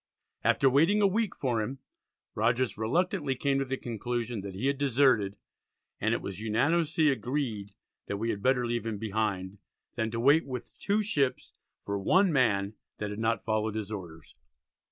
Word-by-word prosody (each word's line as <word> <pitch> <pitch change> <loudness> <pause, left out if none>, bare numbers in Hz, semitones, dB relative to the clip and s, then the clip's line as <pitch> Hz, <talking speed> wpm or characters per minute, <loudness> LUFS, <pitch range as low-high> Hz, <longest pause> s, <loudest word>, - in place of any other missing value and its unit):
After 135 - +4
waiting 160 +11 +4
a 205 - +4
week 210 +1 0
for 120 -5 0
him 125 +6 -4 0.6
Rogers 120 +3 +1
reluctantly 145 - 0
came 135 +1 +1
to 135 - 0
the 135 0 -3
conclusion 120 -1 -3
that 95 -1 -7
he 100 - -3
had 140 0 +1
deserted, 130 -7 +3 0.6
and - - +1
"it - - -5
was 95 -1 -5
unanimously 150 +8 +2
agreed, 120 -6 -2 0.3
that 100 - -2
we 115 +3 -1
had 100 - -5
better 130 +1 +2
leave 120 -1 -2
him 110 -2 -2
behind, 100 -3 -2 0.3
than 110 -1 -1
to 115 +1 -3
wait 140 +6 +4
with 125 -3 -6
two 210 +1 +1
ships 140 -10 -1 0.3
for 100 0 -2
one 185 - +3
man 105 -7 +2 0.2
that 105 -1 -4
had 105 - -6
not 115 +1 0
followed 110 -1 0
his 110 -1 -4
orders." 85 -6 -8
120 Hz, 175 wpm, -29 LUFS, 105-140 Hz, 0.6 s, After